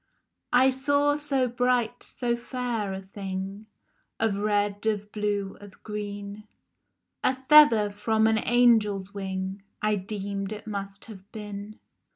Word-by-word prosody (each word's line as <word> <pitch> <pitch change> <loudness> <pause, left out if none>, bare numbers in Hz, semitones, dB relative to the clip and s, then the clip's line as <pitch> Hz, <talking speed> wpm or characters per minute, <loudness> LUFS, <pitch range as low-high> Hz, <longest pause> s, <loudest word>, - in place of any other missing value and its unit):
I 260 +2 +6
SAW 285 +2 +2
so 280 -3 +1
bright, 245 -1 0
so 240 -2 -2
fair 240 -4 -3
a 190 0 -5
thing, 195 +1 -6 0.5
Of 220 -3 +1
red, 205 -1 0
of 210 -1 -1
blue, 205 -2 -2
of 205 -2 -14
green, 205 0 -6 0.8
A 260 - +3
feather 260 -6 +6
from 220 +2 +1
an 220 0 +3
angel's 215 -5 +3
wing 190 0 -4 0.2
I 215 0 +1
deemed 200 0 -4
it 210 0 -9
must 200 -2 -6
have 200 -2 -13
been. 210 0 -7
210 Hz, 130 wpm, -27 LUFS, 200-240 Hz, 0.8 s, I